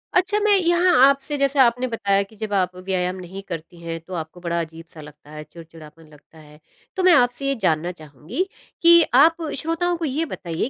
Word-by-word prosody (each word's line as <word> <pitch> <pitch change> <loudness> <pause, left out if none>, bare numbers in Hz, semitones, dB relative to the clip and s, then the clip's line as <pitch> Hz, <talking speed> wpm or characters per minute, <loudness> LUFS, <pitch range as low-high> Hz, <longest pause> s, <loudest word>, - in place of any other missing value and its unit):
अच्छा, 395 +3 +2
मैं 415 -1 +3
यहाँ 350 0 +2
आपसे 275 +1 +1
जैसे 275 0 +1
आपने 250 0 +3
बताया 200 -4 0
कि 215 +3 -18
जब 210 -1 -6
आप 185 -2 0
व्यायाम 185 0 -2
नहीं 185 +2 -9
करती 170 0 -8
हैं, 165 0 -5
तो 185 +3 -12
आपको 160 +1 -6
बड़ा 170 -1 -2
अज़ीब-सा 165 0 -10
लगता 150 0 -15
है 155 0 -8
चिड़चिड़ापन 160 0 -15
लगता 150 +2 -20
है, 150 0 -17 0.4
तो 375 - -2
मैं 365 -2 +6
आपसे 250 0 +2
ये 275 - 0
जानना 170 0 0
चाहूँगी 155 - -6 0.3
कि 340 0 +7
आप 320 +5 +5 0.2
श्रोताओं 345 +2 -1
को 330 - -3
ये 300 +4 -2
बताइए 175 - -4
190 Hz, 195 wpm, -22 LUFS, -, 0.4 s, कि